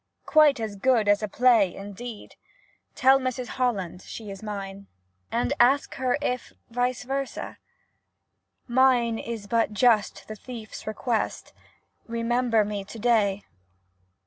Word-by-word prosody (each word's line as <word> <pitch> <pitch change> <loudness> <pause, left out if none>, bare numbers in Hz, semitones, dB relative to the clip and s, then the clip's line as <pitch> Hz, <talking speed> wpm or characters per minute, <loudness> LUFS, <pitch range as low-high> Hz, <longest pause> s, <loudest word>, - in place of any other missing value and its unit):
*■ - - -43
Quite 305 -4 +5
as 215 -3 -4
good 230 0 +2
as 205 +1 +4
a 215 - -1
play,' 225 -4 +3
indeed! 205 +3 -8 0.6
Tell 265 +1 +5
Mrs 255 -1 -3
Holland 200 -9 -2
she 215 0 -8
is 195 - -9
mine. 200 -2 -6 0.4
Ask 260 +3 +2
her 255 0 0
if 250 -2 -2 0.2
vice 245 +1 -1
versa? 270 +2 -4 1.1
Mine 245 -2 +3
is 230 -3 -6
but 225 0 +1
just 220 -1 +2
the 215 - -6
thiefs 225 -1 -9
request 220 +1 -2 0.2
— - - -37
* - - -40
Remember 230 -2 +2
me 205 -1 -4
to 200 +4 -10
day.' 210 -4 +2
230 Hz, 135 wpm, -26 LUFS, 205-250 Hz, 1.1 s, Quite